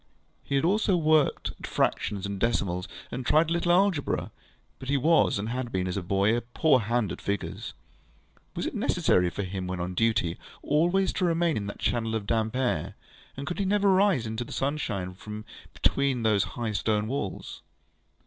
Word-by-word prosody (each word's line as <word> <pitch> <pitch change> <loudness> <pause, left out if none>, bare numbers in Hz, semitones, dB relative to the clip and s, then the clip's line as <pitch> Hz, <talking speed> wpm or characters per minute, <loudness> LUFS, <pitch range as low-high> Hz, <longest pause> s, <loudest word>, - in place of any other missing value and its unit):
He 140 - -2
had 135 - +2
also 195 0 +2
worked 155 -2 +2
at - - -6
fractions 100 -2 0
and 100 -1 -4
decimals, 95 -5 0 0.2
and 125 - -4
tried 155 +5 +3
a - - +3
little 175 0 +1
algebra; 180 -4 +1 0.5
but 130 - -7
he 140 - +3
was, 160 -1 +3
and 105 +2 -3
had 125 0 -3
been 95 -1 -1
as 90 - -2
a 100 - -1
boy, 100 +4 +2
a 120 - -1
poor 130 +4 +2
hand 115 0 0
at - - -6
figures. 100 -1 -4 0.8
Was - - -2
it - - -3
necessary 90 -1 +2
for 100 - -4
him 95 0 -4
when 90 0 -3
on 90 +1 -3
duty 105 -5 +1 0.2
always 175 +6 +2
to 185 - 0
remain 170 -2 +2
in 100 -1 -3
that 100 - -6
channel 115 -2 -1
of 110 -2 -3
damp 110 +1 0
air, 120 -12 -1 0.4
and 140 - -5
could 175 +6 -4
he 200 - +1
never 200 0 +3
rise 185 - +3
into 110 +2 -3
the - - -12
sunshine 105 -10 -2
from 105 +3 -8 0.3
between 135 -4 +1
those 105 -3 +3
high 115 -3 -2
stone 105 0 0
walls? 120 -6 -4
120 Hz, 190 wpm, -27 LUFS, 100-155 Hz, 0.8 s, tried